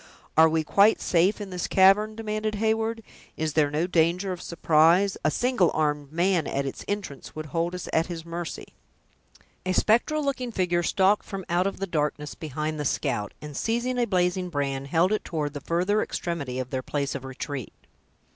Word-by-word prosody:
"Are 160 0 +7
we 160 0 +1
quite 200 +7 +4
safe 180 +5 +2
in 200 -2 -6
this 180 -1 -3
cavern?" 195 +3 +4
demanded 215 -1 -2
Heyward. 225 +1 0 0.3
"Is 155 -1 -1
there 150 -2 +3
no 150 +4 0
danger 180 +2 +1
of 180 -1 -5
surprise? 170 +4 +3
A 155 - +3
single 240 -1 +2
armed 150 -2 0
man, 175 0 +1
at 140 0 -1
its 135 - -5
entrance, 200 -10 -5
would 155 0 -5
hold 165 +4 -2
us 180 - -6
at 160 +1 +2
his 170 -2 -6
mercy." 170 -1 -6 0.9
A 185 - -1
spectral 260 +10 +2
looking 255 -3 -2
figure 180 -4 +1
stalked 190 +4 +2
from 195 -3 -6
out 175 +2 +2
of 195 - -4
the 195 - -2
darkness 150 -3 -2
behind 155 0 -4
the - - -1
scout, 105 -6 -1
and 150 -1 -8
seizing 240 - -1
a 240 - +3
blazing 180 -1 +1
brand, 140 -3 -2
held 170 +6 +2
it 215 - 0
toward 150 -3 -3
the 145 - -6
further 185 +5 +1
extremity 145 -8 -3
of 130 -1 -4
their 130 - -1
place 140 +1 -2
of 140 - -5
retreat. 135 -1 -6
175 Hz, 185 wpm, -26 LUFS, 150-200 Hz, 0.9 s, Are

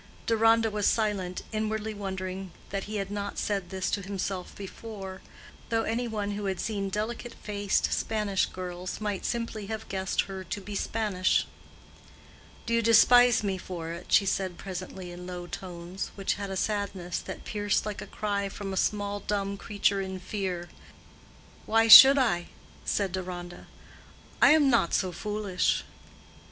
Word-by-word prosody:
Deronda 225 0 +4
was 205 -1 +1
silent, 200 -5 0
inwardly 220 0 -2
wondering 190 -1 -5 0.2
that 195 -1 -3
he 215 - -6
had 195 -1 -3
not 200 0 -4
said 195 -4 -1
this 190 -1 -2
to 200 - 0
himself 190 -1 -4
before, 195 -1 -8 0.5
though 225 -1 +1
any 235 +2 -1
one 210 -2 -2
who 205 0 -4
had 190 -2 -2
seen 200 -3 -2
delicate 225 +4 -4
faced 205 -1 0
Spanish 210 -3 0
girls 180 0 -6
might 205 -3 -3
simply 230 -3 -3
have 220 0 -5
guessed 190 0 0
her 190 -1 -6
to 185 +3 -4
be 205 +1 -8
Spanish. 200 -3 +1 1.2
"Do 230 - -1
you 230 - +4
despise 235 +1 +6
me 195 -2 -1
for 170 -3 -6
it?" 170 +1 -8
she 200 - +6
said 190 -2 -1
presently 185 -1 -7
in 180 +1 -9
low 180 -1 -6
tones, 175 +1 -6
which 195 -1 0
had 200 -1 -5
a 190 - -3
sadness 195 -4 -2
that - - -8
pierced 205 -1 0
like 210 -1 -4
a - - -7
cry 200 -2 -2
from 195 0 -6
a - - -3
small 205 +1 0
dumb 200 -1 -2
creature 200 0 0
in 190 -1 -5
fear. 180 -3 -4 1.0
"Why 225 +1 +4
should 265 +5 +12
I?" 200 -10 +1 0.4
said 175 - 0
Deronda. 175 -1 -6 0.7
"I - - +8
am 305 -3 +5
not 235 -10 +3
so 185 -2 0
foolish." 205 -1 -1
200 Hz, 160 wpm, -28 LUFS, 185-215 Hz, 1.2 s, should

